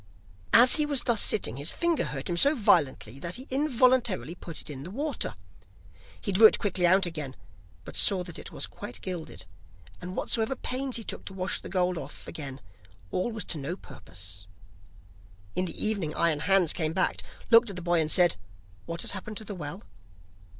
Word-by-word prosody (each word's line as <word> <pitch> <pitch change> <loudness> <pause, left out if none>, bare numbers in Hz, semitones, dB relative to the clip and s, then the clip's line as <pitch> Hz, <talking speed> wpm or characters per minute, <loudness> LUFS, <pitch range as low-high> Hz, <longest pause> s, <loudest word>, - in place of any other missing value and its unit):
As 245 +6 +8
he 300 - +3
was 285 -4 +2
thus 235 -3 +3
sitting, 130 - +2
his 145 +4 -1
finger 340 -2 0
hurt 135 -2 -4
him 175 - -1
so 280 - +4
violently 140 - +2
that 170 +4 -4
he 255 - -3
involuntarily 255 - +2
put 170 -2 -7
it - - -8
in 140 -3 -7
the 160 - -8
water. 280 - -2 0.8
He 200 - -3
drew 215 +4 +9
it - - +2
quickly 185 -3 +1
out 190 +2 +4
again, 155 -6 -5 0.5
but - - -9
saw 190 -3 +2
that 175 -2 -7
it - - -8
was - - -3
quite 120 - -8
gilded, 160 - -6 0.6
and 180 +1 -6
whatsoever 225 +3 0
pains 260 +1 -3
he 230 - -2
took - - -5
to 195 - -8
wash 185 +1 -1
the - - -9
gold 180 -2 0
off 140 -1 -10
again, 140 -3 -7 0.5
all 185 +6 -1
was 220 -2 -4
to 160 - -4
no 145 +6 -4
purpose. 95 - -9 1.1
In 185 - 0
the 170 - -4
evening 200 -8 +1
Iron 165 -3 +2
Hans 185 0 +4
came 160 -2 -1
back, 185 +1 +1 0.3
looked 230 0 +7
at 195 - -6
the 180 - -4
boy, 175 -1 +2
and 155 - -1
said: 175 - +4 0.5
'What 170 0 -2
has - - +1
happened 205 +2 -6
to 220 - -5
the 205 - -6
well? 175 +2 -7
180 Hz, 195 wpm, -28 LUFS, 155-220 Hz, 1.1 s, drew